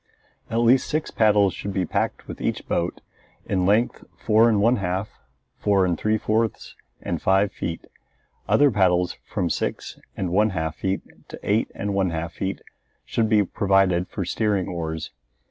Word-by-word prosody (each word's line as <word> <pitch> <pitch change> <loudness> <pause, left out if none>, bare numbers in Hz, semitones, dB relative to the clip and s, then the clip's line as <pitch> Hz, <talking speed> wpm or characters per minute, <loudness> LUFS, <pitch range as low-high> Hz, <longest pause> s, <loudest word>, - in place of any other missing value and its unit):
At 115 +1 0
least 125 +3 +4
six 155 0 -1
paddles 105 -3 +3
should 100 - -5
be 95 -1 0
packed - - -2
with - - -8
each - - -2
boat, 85 +1 -1 0.4
in 95 -2 0
length 110 +4 +2
four 110 +1 +4
and 105 -3 +2
one 115 +4 +3
half, 95 +1 -2 0.5
four 100 -2 +3
and 90 -2 +1
three 110 +6 0
fourths, 110 +1 -1 0.3
and - - -3
five 95 +1 +3
feet. 85 0 -5 0.6
Other 145 -1 +5
paddles 90 -3 +2
from 85 -2 -1
six - - -3 0.2
and 95 -3 -2
one 105 +4 +3
half 80 0 -2
feet 95 0 -2 0.2
to - - -9
eight 105 +3 +1
and 100 0 -3
one 95 -2 +1
half 85 0 -4
feet 95 0 -4 0.4
should 110 -1 0
be 105 -2 +4
provided 95 -2 +2
for 95 - -4
steering 100 0 0
oars. 80 -3 -4
100 Hz, 165 wpm, -24 LUFS, 90-110 Hz, 0.6 s, Other